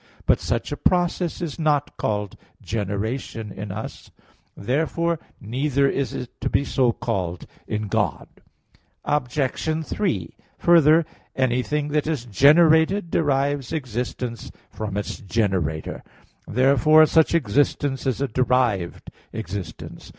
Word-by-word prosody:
But - - +3
such - - -2
a - - -3
process 175 -1 0
is 165 -1 -5
not 150 -3 +1
called 105 -2 -2 0.2
generation 110 +1 -3
in 100 +1 -6
us; 110 +3 -7 0.5
therefore 160 +8 0 0.2
neither 140 +5 0
is 135 -3 -1
it 125 - -8
to - - 0
be 140 - +1
so 125 -4 +2
called 90 -5 -3 0.2
in 105 0 -2
God. - - -1 0.8
Obj. 150 +3 -1
3: 100 - -2 0.2
Further, 165 -1 +5 0.3
anything 130 +3 0
that 150 0 0
is 150 -7 -2
generated 160 - +4
derives 140 -3 0
existence 125 -4 -4 0.2
from 105 -2 -4
its 105 - -4
generator. 95 -7 -1 0.5
Therefore 140 +5 +5
such 160 +2 +3
existence 140 0 +1
is 130 0 -1
a 140 - +1
derived 125 -7 0 0.2
existence. 90 -3 -7
130 Hz, 115 wpm, -23 LUFS, 110-155 Hz, 0.8 s, Further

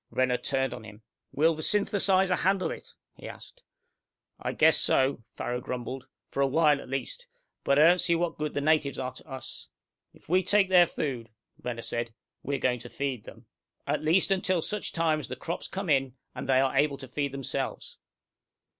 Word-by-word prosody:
Renner 130 -1 +1
turned 135 -2 -1
on 120 - -8
him. 110 0 -13 0.3
"Will 160 +3 +3
the 155 - -6
synthetizer 195 -1 +2
handle 190 0 +1
it?" - - -8 0.3
he - - -8
asked. - - -12 0.8
"I - - -2
guess 160 0 +5
so," 135 -2 +2
Farrow 125 0 -3
grumbled. 125 +2 -5 0.2
"For 140 - -1
a 140 - +4
while, 150 0 +3
at - - -12
least. 485 - -4 0.4
But 140 - +3
I 150 - +7
don't 175 +2 +6
see 170 - +3
what 170 -1 -2
good 150 -1 -3
the 145 - 0
natives 155 -1 +2
are 130 -1 -3
to - - -12
us." 130 0 -6 0.4
"If - - -22
we 185 +3 +3
take 195 +1 +3
their 180 -2 +7
food," 125 -9 -4 0.3
Renner 120 -2 -4
said, 115 -1 -3 0.3
"we're 140 +1 -2
going 125 -2 0
to 120 +1 -10
feed 135 -5 -3
them. - - -13 0.4
At - - -1
least 165 +6 +3
until 185 -3 +1
such 210 -2 -2
time 160 -2 +1
as 150 - -6
the 130 - -5
crops 170 +5 -5
come 195 0 -5
in, 135 -4 +2 0.2
and - - -7
they 130 -1 +5
are 135 -1 0
able 145 -2 +2
to 135 - -9
feed 140 +2 -2
themselves!" 135 -2 -4
145 Hz, 195 wpm, -28 LUFS, 130-175 Hz, 0.8 s, I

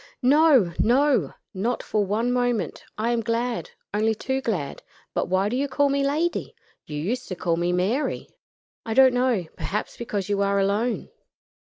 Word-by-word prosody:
"No! 270 - +5
no! 275 +4 +3 0.2
not 220 +6 -1
for 210 - 0
one 220 +5 0
moment; 245 -8 -1
I 225 +2 0
am 235 -1 +1
glad 235 +1 -2 0.2
only 220 +1 +2
too 265 +4 -2
glad. 180 - -3 0.3
But - - -1
why 190 +2 +2
do 225 - -1
you 280 +2 0
call 285 0 +2
me 280 0 +1
'Lady'? 305 +5 -1 0.3
You 150 - -5
used 230 +12 -2
to 185 - -4
call 170 -1 0
me 175 +1 0
'Mary.'" 195 +11 0 0.6
"I 225 -1 -3
don't 260 -1 +7
know; 245 -7 +1
perhaps 210 - -4
because 205 -5 -3
you 200 -1 0
are 200 0 +2
alone." 205 +5 0
230 Hz, 170 wpm, -24 LUFS, 200-255 Hz, 0.6 s, don't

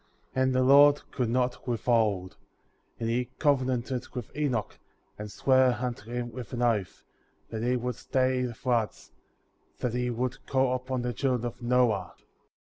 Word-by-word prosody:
51. 130 - +2
And 130 0 +1
the 130 - +3
Lord 145 +2 +7
could 125 -4 -1
not 125 +1 -1
withhold; 110 -6 +1 0.6
and 115 - -2
he 120 +2 0
covenanted 130 -3 0
with 125 -3 -6
Enoch, 135 -8 -2 0.4
and 105 0 -5
sware 130 +2 +3
unto 120 -3 -4
him 120 0 -3
with 120 -1 -8
an 120 - -2
©ath, 110 -7 0 0.5
that 110 - -4
he 125 +2 +1
would 125 0 -2
stay 130 +2 0
the 125 -2 -3
floods; 120 -3 -1 0.7
that 120 - -2
he 125 0 0
would 125 +2 -3
call 130 -1 +2
upon 130 0 -2
the 125 0 -2
children 125 0 0
of 120 +1 -6
Noah; 120 -2 +2
52. - - -32
125 Hz, 165 wpm, -28 LUFS, 120-130 Hz, 0.7 s, Lord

